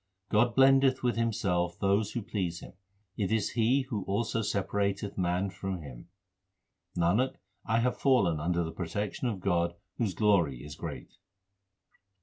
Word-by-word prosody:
God 115 +2 +3
blendeth 135 -1 +5
with 120 -1 +1
Himself 90 -7 0
those 100 +2 +1
who 120 - -3
please 90 -6 -3
Him; - - -11 0.4
it 100 -1 -1
is 110 -2 +1
He 120 +4 +2
who 115 -7 -4
also 115 +3 -1
separateth 100 0 -1
man 90 +1 0
from 95 -1 -5
Him. 65 -4 -10 0.9
Nanak, 100 +10 +2 0.3
I 115 +1 +2
have 125 +1 0
fallen 100 - +3
under 85 +2 0
the 80 - -4
protection 100 +8 -3
of 105 -5 -2
God 85 -3 +1 0.2
whose 110 -6 0
glory 85 - +2
is 75 0 -8
great. - - -8
100 Hz, 145 wpm, -30 LUFS, 90-115 Hz, 0.9 s, blendeth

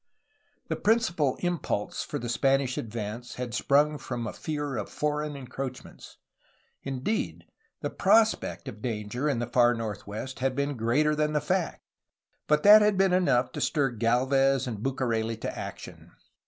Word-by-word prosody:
The - - -1
principal 205 - +2
impulse 175 - -2
for - - -4
the 120 - -5
Spanish 135 +1 +1
advance 115 +2 -5
had 125 -2 -5
sprung 145 +4 +2
from 120 -2 -4
a 110 - -4
fear 145 -3 -4
of 105 -3 -4
foreign 150 0 -2
encroachments; 130 -1 -8 0.6
indeed, 135 - -3 0.4
the - - -3
prospect 220 0 +2
of 105 - -8
danger 120 +5 -2
in 140 - 0
the 120 - -1
far 120 0 +3
northwest 110 +3 -5
had 130 0 0
been 140 +1 -1
greater 130 +7 +2
than 150 0 0
the 150 - +2
factj 175 +4 -1 0.7
but 150 0 +3
that 210 +1 +9
had 210 -2 +3
been 190 -1 +3
enough 125 -9 +2
to - - -5
stir 140 -4 +1
Gdlvez 130 +4 +2
and 115 -5 -4
Bucareli 115 -4 -1
to - - -4
action. - - -8
135 Hz, 155 wpm, -28 LUFS, 120-150 Hz, 0.7 s, that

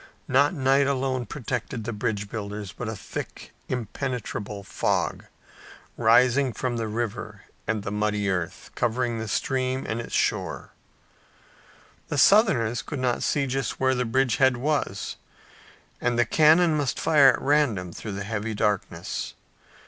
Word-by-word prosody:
Not 140 +6 +3
night 135 0 +3
alone 130 -2 -1
protected 125 -3 -4
the 120 +2 -4
bridge 105 -1 -2
builders, 105 -2 -5
but 115 - -5
a 110 - -4
thick, - - -7 0.2
impenetrable 115 -4 -4
fog, - - -1 0.7
rising 125 +3 +4
from 125 0 -2
the 115 -1 -2
river 110 -2 -4 0.2
and 110 -1 -1
the 100 - -4
muddy 105 -1 0
earth, 90 -4 -3
covered 120 -1 0
the 110 - -4
stream 130 +3 -1
and 110 +2 -2
its - - -5
shores. - - -1 1.4
The 145 - -3
Southerners 135 - +4
could 145 - -6
not 125 -2 0
see 140 -2 +1
just 135 -2 -2
where 130 0 +3
the 125 -1 0
bridge 130 +1 +1
head 130 -2 +4
was 145 +4 -2 0.8
and 120 -1 +1
their 120 - +4
cannon 160 +1 +5
must 145 -5 -1
fire 145 -4 +6
at - - -3
random 120 - +1
through 105 - -6
the 100 +1 -4
heavy 110 +1 -3
darkness. 105 -1 -2
120 Hz, 145 wpm, -25 LUFS, 105-135 Hz, 1.4 s, fire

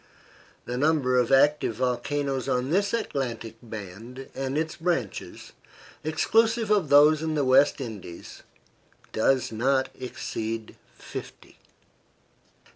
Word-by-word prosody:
The 125 +1 -3
number 145 -4 +2
of 125 0 +1
active 140 -3 +4
volcanoes 130 +3 -1
on 125 +3 0
this 200 +3 +2
Atlantic 125 - -3
band 115 +3 -9
and 135 +1 -3
its 160 0 -2
branches, 165 - -3 0.5
exclusive 225 +8 +2
of 195 -8 +2
those 150 +2 +6
in 160 -1 -1
the 145 -2 +1
West 130 +3 +4
Indies, 105 -9 -8 0.7
does 125 +2 +2
not 130 +4 +1
exceed 115 -3 -5 0.2
fifty. - - -10
135 Hz, 110 wpm, -26 LUFS, 120-155 Hz, 0.7 s, those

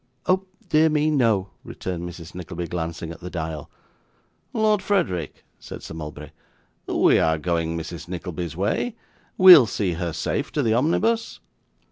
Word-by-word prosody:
'Oh 190 +1 +1 0.2
dear 160 0 +4
me 155 0 +2
no,' 110 -9 +2
returned 90 -1 -5
Mrs. 85 -1 -11
Nickleby, 90 -1 -6
glancing 85 0 -4
at 85 - -10
the 90 - -7
dial. 80 -4 -5 0.8
'Lord 215 -3 +2
Frederick,' 170 - -1
said - - -9
Sir - - -8
Mulberry, 75 -2 -8 0.6
'we - - +4
are 80 0 +2
going 85 0 -1
Mrs. 85 +1 -7
Nickleby's 85 -2 -5
way. 105 - -1 0.4
We'll 180 -10 +10
see 100 -4 -1
her 85 0 -3
safe 140 - -2
to 145 - 0
the 110 -2 +2
omnibus? 220 - +1
90 Hz, 145 wpm, -23 LUFS, -, 0.8 s, We'll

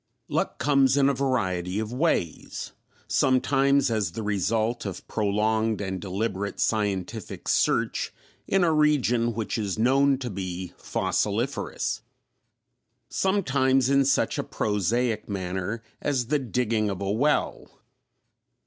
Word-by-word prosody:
Luck - - -1
comes 140 -2 +3
in 140 0 +5
a - - +2
great 130 - -7
variety 95 -9 0
of 110 +2 -3
ways: 125 - -1 0.4
sometimes 135 +1 +3
as 105 -7 0
the 110 - -4
result 110 +3 0
of 95 -3 -6
prolonged 110 +1 +1
and 95 -2 -3
deliberate 100 +1 -3
scientific 100 -4 -2
search - - +1 0.4
in 195 -1 +3
a 165 -2 +3
region 125 -7 +2
which 110 0 -2
is 100 -3 -2
known 135 +4 +3
to 125 -3 -5
be 90 -2 -5
fossiliferous; - - -1 1.1
sometimes 135 -9 +2
in 140 0 +5
such 135 - +1
a - - 0
prosaic 110 +3 -1
manner 95 +3 -3 0.2
as 130 -5 -1
the 150 0 +2
digging 115 -4 0
of 95 -2 -4
a 100 0 -1
well. 140 +8 0
115 Hz, 125 wpm, -26 LUFS, 100-135 Hz, 1.1 s, in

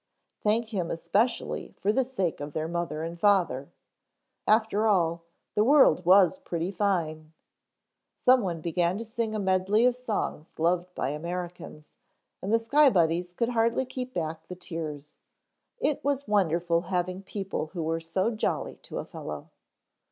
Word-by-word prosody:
Thank 220 +2 +1
Him 185 -6 -2
especially 195 +9 -1
for 210 - +1
the 265 - +3
sake 210 -10 -2
of 145 0 -6
their 155 0 -2
mother 170 -2 -3
and 170 +1 -6
father 170 -9 +2 0.8
after 220 0 +3
all, 170 -5 +2 0.3
the 210 - +3
world 265 - +5
was 195 +8 +6
pretty 175 - -3
fine. 165 -6 -1 0.9
Someone 205 -11 +3
began 175 +2 0
to 230 - -5
sing 225 -1 -3
a - - -1
medley 190 +3 +2
of 250 -1 +4
songs 220 -10 -3
loved 175 +2 +1
by 130 - -1
Americans, 170 0 -6 0.5
and 195 - -3
the 225 - +5
Sky 280 +6 +5
Buddies 175 -3 +1
could 230 +6 -1
hardly 235 +2 +1
keep 255 0 -5
back 160 -1 -3
the 180 - -7
tears. 155 -5 -7 0.6
It 300 - 0
was 280 -1 -1
wonderful 175 -4 +2
having 180 +1 -2
people 195 -4 -4
who 170 0 -5
were 165 +1 -1
so 185 +7 0
jolly 220 - -2
to - - -8
a - - -4
fellow. - - -8
185 Hz, 150 wpm, -28 LUFS, 165-220 Hz, 0.9 s, was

